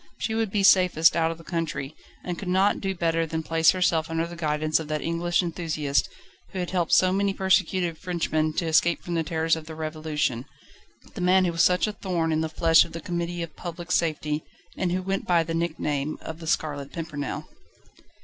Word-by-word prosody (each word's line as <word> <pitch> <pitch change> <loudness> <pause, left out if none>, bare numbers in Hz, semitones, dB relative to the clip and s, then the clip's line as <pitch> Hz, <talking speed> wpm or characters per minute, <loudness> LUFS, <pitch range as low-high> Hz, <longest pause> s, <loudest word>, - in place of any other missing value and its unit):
She 220 - -2
would 225 -1 0
be 200 0 0
safest 180 -4 +5
out 165 -1 +2
of 165 - -5
the 165 - -14
country, 155 -5 -3 0.3
and 180 - -2
could 200 - -6
not 190 +3 +2
do 195 -1 -2
better 165 -1 0
than 160 0 -3
place 160 0 +3
herself 170 -4 +2
under 165 0 -1
the 170 0 -8
guidance 155 -1 0
of 160 - -6
that 155 -1 -2
English 175 +2 0
enthusiast, 160 -4 -1 0.4
who - - -5
had 180 -1 -3
helped 175 -3 0
so 185 0 +5
many 200 0 +1
persecuted 185 -3 +1
Frenchmen 160 -3 -1
to 170 - -1
escape 165 +1 +2
from 175 - -4
the 165 - +1
terrors 160 0 +1
of 160 -1 -8
the 160 - -7
Revolution: 155 -5 -2 0.7
the - - -6
man 185 +1 +4
who 175 - +1
was 165 0 0
such 180 0 +4
a 215 - -2
thorn 175 -5 -1
in 155 0 +1
the 160 - -2
flesh 165 +1 +5
of 170 - -11
the 165 - -5
Committee 170 +1 -3
of 165 - -9
Public 175 0 -7
Safety, 155 -2 0 0.3
and 180 -2 -1
who 185 +1 -1
went 195 +1 -2
by 170 -2 +4
the 165 0 -4
nickname 155 -3 -2
of 160 0 -7
The 165 - -8
Scarlet 145 -3 -1
Pimpernel. 155 -4 -5
165 Hz, 210 wpm, -25 LUFS, 155-180 Hz, 0.7 s, safest